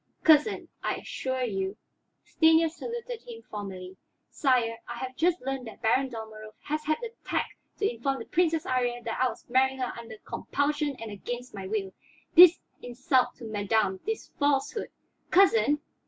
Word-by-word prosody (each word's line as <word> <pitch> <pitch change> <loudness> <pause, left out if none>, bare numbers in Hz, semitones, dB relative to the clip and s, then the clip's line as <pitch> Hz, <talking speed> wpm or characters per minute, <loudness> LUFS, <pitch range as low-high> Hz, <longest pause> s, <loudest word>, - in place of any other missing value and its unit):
"Cousin, 315 +5 +4
I - - -1
assure 260 -1 -3
you 195 -3 -2 0.3
" - - -50
Stanief 320 0 +5
saluted 470 +5 -6
him 465 -2 -10
formally. 190 -3 -7 0.3
"Sire, 240 -5 +1
I 240 - -5
have 255 +1 -5
just 350 +3 +2
learned 265 -1 -4
that 225 - -12
Baron 260 +4 +3
Dalmorov 220 -2 -9
has 305 +1 -3
had 310 +1 +1
the 470 -2 -5
tact - - -1 0.3
to 410 - +1
inform 270 +4 -1
the 230 - -7
Princess 325 -2 +1
Iría 245 -1 0
that 230 0 -3
I 255 - +4
was - - -10
marrying 265 +1 +2
her 255 -2 -2
under 230 -2 -9
compulsion 290 0 -1
and 225 -3 -8
against 245 +5 -6
my 195 -2 -6
will. 195 -2 -2 0.4
This 350 0 +9 0.2
insult 250 +1 +1
to 245 - -13
madame, 205 -2 0
this 445 +1 -4
falsehood 285 - +1 0.2
" - - -45
"Cousin!" 290 - +5
255 Hz, 170 wpm, -28 LUFS, 225-305 Hz, 0.4 s, This